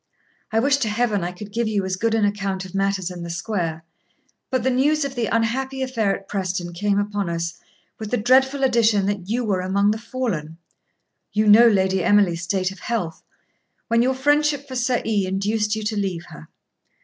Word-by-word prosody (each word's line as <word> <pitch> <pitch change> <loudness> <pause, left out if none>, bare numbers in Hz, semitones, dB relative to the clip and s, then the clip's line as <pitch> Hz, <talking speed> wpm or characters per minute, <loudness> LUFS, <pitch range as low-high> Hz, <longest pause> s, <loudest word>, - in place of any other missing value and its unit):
I 220 - 0
wish 275 +3 +3
to 245 -6 -1
Heaven 210 -3 0
I 175 - -2
could 200 +3 -10
give 235 0 0
you 205 -3 0
as 190 0 -1
good 225 +4 0
an 220 -2 +2
account 195 -2 -2
of 185 - -11
matters 195 -2 -1
in 175 -1 -8
the 170 - -6
square. 170 -3 -3 0.7
But 260 -3 0
the 260 - +2
news 285 +4 +2
of 275 - -4
the 240 -4 -1
unhappy 265 +4 -1
affair 225 -6 0
at 195 - -11
Preston 185 -3 -3
came 200 +3 0
upon 205 -2 -1
us, 170 0 -3 0.4
with 215 -1 -5
the 245 - 0
dreadful 265 +5 +3
addition 230 -6 +3
that 200 -2 -3
you 240 +3 0
were 195 -4 0
among 200 +3 +2
the 215 - -3
fallen. 220 - -4 0.8
You 215 +1 +2
know 215 +3 +8
Lady 190 -3 +2
Emily's 195 -5 +3
state 185 +2 -1
of 195 - -12
health, 190 -9 -3 0.7
when 230 0 +3
your 260 +2 +1
friendship 290 +1 +1
for 260 - -7
Sir 245 0 0
E. 205 -4 +1
induced 210 +3 0
you 220 - -4
to 210 +1 -2
leave 190 -4 -2
her. 75 +1 -12
210 Hz, 200 wpm, -22 LUFS, 190-235 Hz, 0.8 s, know